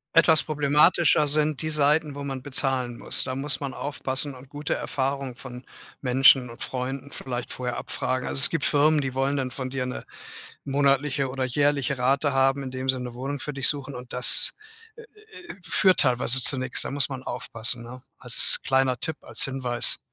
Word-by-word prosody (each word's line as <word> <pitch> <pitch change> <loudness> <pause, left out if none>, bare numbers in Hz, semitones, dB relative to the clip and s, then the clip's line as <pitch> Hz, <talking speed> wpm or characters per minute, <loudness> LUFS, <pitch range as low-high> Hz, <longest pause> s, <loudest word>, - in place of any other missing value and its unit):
Etwas 165 -1 +4
problematischer 150 +1 +1
sind 150 +1 -1
die 155 - -3
Seiten, 150 0 +1
wo 140 0 -9
man 135 -2 -7
bezahlen 130 -3 0
muss. - - +4
Da 130 - -6
muss 140 +1 +2
man 140 -2 -7
aufpassen 140 0 0
und 130 +1 -16
gute 145 +1 -6
Erfahrungen 135 -2 -5
von 125 -1 -12 0.4
Menschen 130 -1 +2
und 115 - -16
Freunden 135 +2 -7
vielleicht 125 -3 -8
vorher 125 -1 -6
abfragen. 130 0 -5
Also, - - +2
es - - +7
gibt 165 -5 -4
Firmen, 150 +2 +1
die 135 -2 -6
wollen 135 +2 -2
dann 130 -1 -4
von 130 0 -8
dir 130 -2 -5
'ne 125 - -8 0.6
monatliche 140 0 -1
oder 130 0 -5
jährliche 140 0 -2
Rate 140 +3 -1
haben, 135 +1 0
indem 130 0 -7
sie 130 -1 0
'ne 125 -1 -8
Wohnung 135 +3 -7
für 150 - -7
dich 135 0 +1
suchen 140 -1 -3
und 125 -1 -12
das, 125 0 +6 0.4
äh, 465 - -14
äh, 430 -5 -16
führt 185 0 0
teilweise 125 0 +2
zu 135 - +6
nix. 130 0 +1
Da - - -5
muss 140 0 +1
man 130 -1 -8
aufpassen, 115 0 0
ne? 125 +2 -12 0.2
Als 125 -2 +4
kleiner 130 -2 -1
Tipp, 160 -2 -2
als - - +4
Hinweis. 125 -3 +3
135 Hz, 190 wpm, -23 LUFS, 130-145 Hz, 0.6 s, es